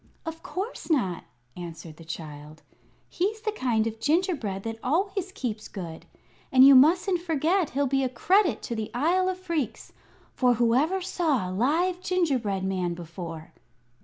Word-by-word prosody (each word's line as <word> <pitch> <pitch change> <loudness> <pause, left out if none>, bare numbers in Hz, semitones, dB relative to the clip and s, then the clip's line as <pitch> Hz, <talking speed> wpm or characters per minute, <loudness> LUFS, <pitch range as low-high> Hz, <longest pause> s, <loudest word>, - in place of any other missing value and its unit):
"Of 325 0 -6
course 375 +6 -5
not," 195 - 0 0.3
answered 165 -2 -9
the 165 - -12
child. 155 -1 -9 0.4
"He's 420 +5 -2
the 430 -1 -1
kind 240 - 0
of 225 0 -4
gingerbread 290 - 0
that 225 0 -5
always 380 +7 0
keeps 235 - -4
good. 170 -5 -8 0.4
And 260 0 +8
you 275 - +9
mustn't 345 +7 +5
forget 335 +1 +1
he'll 285 - +3
be 270 0 +1
a 260 - 0
credit 365 - +2
to 235 - -4
the 220 -1 -3
Isle 355 +8 +2
of 370 - -2
Phreex; 335 - -3 0.4
for 250 -2 +3
whoever 260 +11 +2
saw 315 - 0
a - - -4
live 325 - +1
gingerbread 265 - 0
man 185 -2 -1
before?" 165 -1 -8
265 Hz, 155 wpm, -26 LUFS, -, 0.4 s, you